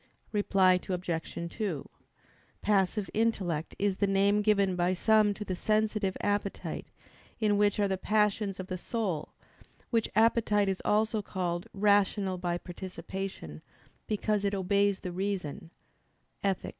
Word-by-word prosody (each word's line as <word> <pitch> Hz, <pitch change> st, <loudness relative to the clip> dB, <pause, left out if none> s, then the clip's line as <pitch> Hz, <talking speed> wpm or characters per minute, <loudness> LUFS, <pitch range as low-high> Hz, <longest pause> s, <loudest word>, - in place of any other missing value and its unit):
Reply 190 Hz, -3 st, +3 dB
Obj. 170 Hz, -2 st, -3 dB
2: 190 Hz, -10 st, -3 dB, 0.7 s
"Passive 200 Hz, 0 st, +2 dB
intellect" 190 Hz, -8 st, 0 dB
is 200 Hz, -1 st, 0 dB
the 200 Hz, -, +2 dB
name 200 Hz, +1 st, +3 dB
given 200 Hz, -3 st, +3 dB
by 180 Hz, +1 st, +1 dB
some 215 Hz, +2 st, +4 dB
to 210 Hz, -, -6 dB
the 185 Hz, -, -2 dB
sensitive 215 Hz, -1 st, 0 dB
appetite, 205 Hz, -1 st, -2 dB, 0.5 s
in 210 Hz, -2 st, +3 dB
which 205 Hz, +1 st, +2 dB
are 205 Hz, -, +3 dB
the 190 Hz, -1 st, -2 dB
passions 210 Hz, -2 st, +1 dB
of 185 Hz, -, -4 dB
the 185 Hz, -1 st, -5 dB
soul; 190 Hz, -8 st, -3 dB, 0.6 s
which 230 Hz, -2 st, +1 dB
appetite 215 Hz, -2 st, +3 dB
is 190 Hz, -, -2 dB
also 215 Hz, +1 st, +2 dB
called 175 Hz, -3 st, -3 dB
"rational 200 Hz, -2 st, +2 dB
by 175 Hz, -1 st, -1 dB
participation," 185 Hz, -, -7 dB, 0.5 s
because 210 Hz, -1 st, 0 dB
it 200 Hz, 0 st, +1 dB
"obeys 200 Hz, +1 st, +1 dB
the 180 Hz, -, -4 dB
reason" 180 Hz, -5 st, -3 dB, 0.7 s
(Ethic. 195 Hz, -2 st, 0 dB
200 Hz, 130 wpm, -30 LUFS, 185-210 Hz, 0.7 s, some